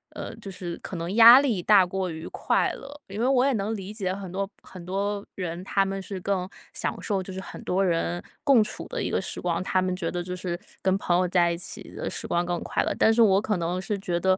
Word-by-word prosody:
嗯， - - -6
就 205 -3 -7
是 180 -2 -5
可 - - -6
能 170 +3 -3
压 235 +3 +10
力 235 -10 0
大 200 -2 +6
过 185 0 -2
于 160 0 -7
快 - - +1
乐。 290 +2 -10
因 200 +1 -7
为 240 - +2
我 260 -1 +4
也 275 - +3
能 215 +1 -1
理 195 -1 -6
解 190 -4 -2
很 190 -2 -7
多 195 +1 -2 0.2
很 180 -2 -11
多 200 +2 -2
人， 175 -2 -4
他 195 - +2
们 195 0 -3
是 190 0 -6
更 190 -2 -1 0.3
享 - - -2
受 195 -3 -1
就 190 - -7
是 190 - -5
很 - - -9
多 190 +2 +1
人 175 0 0 0.2
共 270 -6 +6
处 - - -6
的 - - -4
一 - - -1
个 - - +1
时 - - -5
光， 175 -1 -1
他 185 0 +1
们 185 0 -1
觉 175 -3 -2
得 175 - -2
就 180 +1 -5
是 175 -1 -4 0.2
跟 190 0 +3
朋 175 - +2
友 180 0 +2
在 175 -1 +3
一 170 - -2
起 175 - -7
的 - - -4
时 - - -4
光 175 +1 +1
更 175 -1 -2
快 - - 0
乐。 - - -1
但 220 - +6
是 230 - 0
我 195 -3 +5
可 210 -2 0
能 175 +2 -2
是 200 +3 -2
觉 175 -3 -1
得， 185 +1 +3
190 Hz, 285 characters per minute, -26 LUFS, 180-205 Hz, 0.3 s, 压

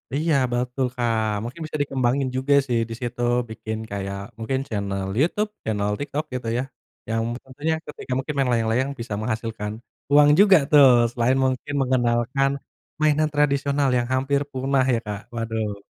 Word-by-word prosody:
Iya 160 +2 +1 0.2
betul, 125 +2 -1
Kak, 120 -2 0 0.3
mungkin 125 +8 -7
bisa 155 - -4
dikembangin 135 -1 0
juga 135 +2 +1
sih 120 -2 +1
disitu 120 +1 -5 0.3
bikin 110 -1 -5
kayak 100 -1 -4 0.2
mungkin 130 +4 -1
channel 100 -2 -3
YouTube, 210 +8 +1
channel 105 -2 -1
TikTok 145 +2 -3
gitu 125 -2 -4
ya. 125 - 0 0.5
Yang 115 - 0 0.2
tentunya 145 +5 -2
ketika 150 - -9
mungkin 145 +3 -3
main 135 -2 +2
layang-layang 115 +3 +1
bisa 115 -2 -5
menghasilkan 110 -1 -3 0.4
uang 145 0 +7
juga 195 -2 +8
tuh, 145 -2 +8 0.2
selain 120 +2 +1
mungkin 130 +2 -1
mengenalkan 130 +2 +1 0.5
mainan 155 0 +3
tradisional 140 -1 +2
yang 120 0 0
hampir 135 +2 +1
punah 130 0 +1
ya, 115 - +2
Kak, 105 -1 -3 0.2
waduh. 110 -2 -2
130 Hz, 150 wpm, -23 LUFS, 115-140 Hz, 0.5 s, juga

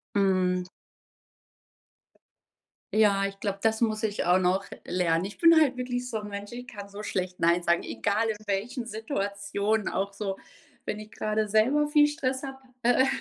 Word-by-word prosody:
Mhm. 185 -2 +2 2.3
Ja, 200 -2 +4
ich 195 0 -4
glaube, 200 -2 -2
das 220 0 +2
muss 215 -1 +1
ich 210 -4 -1
auch 180 +1 +5
noch 185 +1 +1 0.2
lernen. 175 -1 +1
Ich 205 - -7
bin 330 -1 +7
halt 270 -5 +3
wirklich 250 0 -3
so 220 - -2
'n 210 - -7
Mensch, 200 +1 -7
ich 245 +1 -7
kann 205 -5 -9
so 200 +1 -7
schlecht 185 -3 -3
„Nein“ 170 +1 +3
sagen, 170 0 +2
egal 215 +3 0
in 220 - -1
welchen 225 +6 -2
Situationen, 205 -2 -2
auch 200 +1 -2
so 195 -1 -3 0.5
wenn 210 - -3
ich 215 0 -11
grade 215 0 -1
selber 255 +8 +3
viel 295 0 +6
Stress 270 -4 -2
habe. 270 -1 -6 0.2
Äh 245 +2 +4
210 Hz, 170 wpm, -27 LUFS, 195-245 Hz, 2.3 s, bin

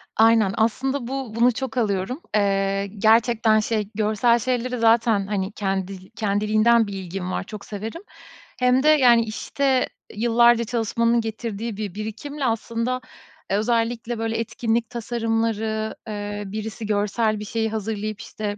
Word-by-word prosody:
Aynen, 225 -3 +4
aslında, 255 +3 0
bu 265 -4 -4
bunu 240 +2 +4
çok 255 0 -5
alıyorum. 215 - -1
Eee, 195 -1 +1
gerçekten, 225 +1 +4
şey, 215 -1 -1
görsel 220 +3 +2
şeyleri 250 +1 -1
zaten, 225 -3 +3
hani, 195 -1 -2
kendi 190 -2 -3
kendiliğinden 215 +1 +2
bir 200 - -6
ilgim 185 -1 -5
var, - - -2
çok 205 +1 -9
severim. 220 - -6 0.6
Hem 250 +2 +3
de, - - +3
yani, 245 -6 +6
işte, 260 +4 0 0.3
yıllarca 235 +1 +4
çalışmanın 230 +1 +1
getirdiği 225 -1 -4
bir 205 -4 -4
birikimle, 235 +7 -5
aslında, 230 +2 -1 0.5
eee, 195 - +3
özellikle 230 +1 -1
böyle 225 0 -1
etkinlik 230 0 -1
tasarımları, 225 -2 -1
eee, 205 -1 -4
birisi 215 +2 -5
görsel 210 +1 0
bir 210 - -6
şeyi 220 +1 -1
hazırlayıp, 215 0 -4
işte, 210 -2 -5
225 Hz, 135 wpm, -23 LUFS, 210-235 Hz, 0.6 s, yani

